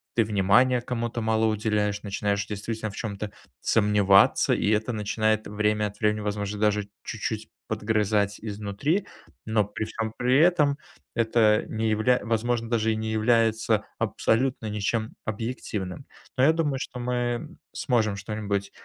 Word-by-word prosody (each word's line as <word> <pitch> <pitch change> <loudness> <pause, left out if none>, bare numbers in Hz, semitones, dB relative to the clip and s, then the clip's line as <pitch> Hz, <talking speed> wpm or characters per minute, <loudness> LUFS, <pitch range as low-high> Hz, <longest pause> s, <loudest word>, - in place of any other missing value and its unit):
ты 115 - +4
внимания 110 +5 +3
кому-то 120 -1 -3
мало 110 0 +2
уделяешь, 105 -2 0
начинаешь, 100 0 -1
действительно, 110 +1 -4
в 100 - -10
чём-то 105 -2 -4 0.3
сомневаться, 105 -2 +4
и - - -1
это 110 +3 0
начинает, 110 +1 0
время 105 0 0
от 105 0 -11
времени, 105 0 +1
возможно, 105 0 -3
даже 105 -1 +1
чуть-чуть - - -4 0.2
подгрызать 105 -1 0
изнутри, 110 - -2 0.4
но 110 -1 +2
при 105 +2 -4
всём 110 0 -4
при 125 +2 +3
этом, 155 -4 +4 0.3
это 110 -2 +3
не 110 0 -1
явля 115 +4 +3
возможно, 115 0 0
даже 115 -1 +1
и - - -2
не 110 0 -3
является 110 -1 +2 0.2
абсолютно 125 0 0
ничем 110 +2 -1
объективным, 110 -1 -4 0.3
но 130 - +2
я 155 - +6
думаю, 150 -5 0
что 125 -1 -6
мы 120 -1 -1 0.3
сможем 110 -4 +1
что-нибудь, 100 -1 -3
110 Hz, 140 wpm, -26 LUFS, 105-120 Hz, 0.4 s, я